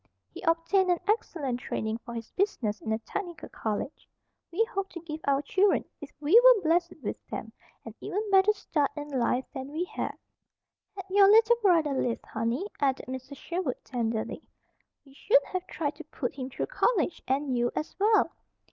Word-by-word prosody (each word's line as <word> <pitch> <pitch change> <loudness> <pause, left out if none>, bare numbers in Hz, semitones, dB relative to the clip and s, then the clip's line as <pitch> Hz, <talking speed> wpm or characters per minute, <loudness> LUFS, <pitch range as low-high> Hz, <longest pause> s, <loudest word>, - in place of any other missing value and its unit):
He - - -8
obtained 330 +3 +2
an 350 -2 +3
excellent 305 - 0
training 220 -2 -3
for 235 0 -9
his 230 -1 -7
business 245 - -1
in 220 - -3
a 220 - +2
technical 345 - -6
college. 220 +6 -4 0.4
We 365 +7 +2
hoped 390 -3 -4
to 340 - -5
give 315 -2 -6
our 280 0 +2
children, 385 +7 +2 0.2
if 290 - -8
we 320 +11 +6
were - - +8
blessed 340 +2 +2
with - - -3
them, - - -6 0.3
an - - -8
even 420 +3 -3
better 385 +2 +6
start 305 -8 0
in 295 0 -5
life 255 -1 0
than 265 -1 -6
we 320 +4 -1
had. 360 - -4 0.8
"Had 385 -2 -6
your 395 0 +7
little 450 +2 +6
brother 330 -8 +4
lived, 245 -3 -1
honey," 230 - -2
added 270 -1 +1
Mrs. 260 +2 -7
Sherwood 340 -6 -3
tenderly, 230 -3 -2 0.6
"we 270 - -18
should - - +3
have 370 0 -4
tried 295 -4 -2
to 320 - -8
put 270 -4 -4
him 260 -1 -5
through 265 - -3
college, 485 -8 +1
and 270 0 0
you, 240 0 +2
as 305 - -3
well. 430 +2 +4
310 Hz, 180 wpm, -28 LUFS, 260-385 Hz, 0.8 s, were